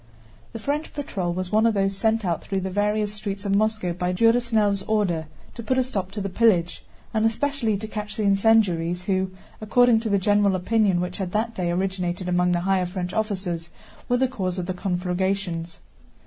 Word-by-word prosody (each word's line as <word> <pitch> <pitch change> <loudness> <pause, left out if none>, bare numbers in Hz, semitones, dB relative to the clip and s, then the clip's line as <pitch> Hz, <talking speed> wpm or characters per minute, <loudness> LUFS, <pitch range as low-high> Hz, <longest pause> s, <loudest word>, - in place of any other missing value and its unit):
The - - -6
French 290 +7 -3
patrol 195 -11 -3
was 185 +1 -4
one 215 +2 +4
of 225 - +1
those 195 0 +1
sent 220 +1 +1
out 170 -2 -1
through 195 -1 -2
the 190 0 -3
various 210 +1 0
streets 200 -1 -5
of 200 - 0
Moscow 215 -3 +1
by 180 +1 -1
Durosnel's 225 -1 +2
order 185 -7 0 0.3
to 235 - -7
put 255 +3 0
a 260 - +4
stop 200 -7 -3
to 210 - -4
the 195 - -2
pillage, 185 -4 +2 0.3
and 220 -1 +1
especially 230 -1 0
to 215 - -6
catch 210 -1 -6
the 215 - 0
incendiaries 195 -4 +3
who, 190 -1 0 0.3
according 235 +2 +4
to 225 0 -3
the 200 - +3
general 205 0 +3
opinion 190 -1 +2
which 180 0 -4
had 185 -3 -4
that 225 +2 0
day 180 -5 -2
originated 180 0 -2
among 180 0 +2
the 175 -1 +1
higher 185 0 +1
French 180 0 -4
officers, 185 -6 -2 0.4
were 245 - +3
the 260 +1 +2
cause 190 -8 -3
of 180 - -2
the 185 - -2
conflagrations. 180 -2 -2
195 Hz, 195 wpm, -24 LUFS, 180-220 Hz, 0.4 s, one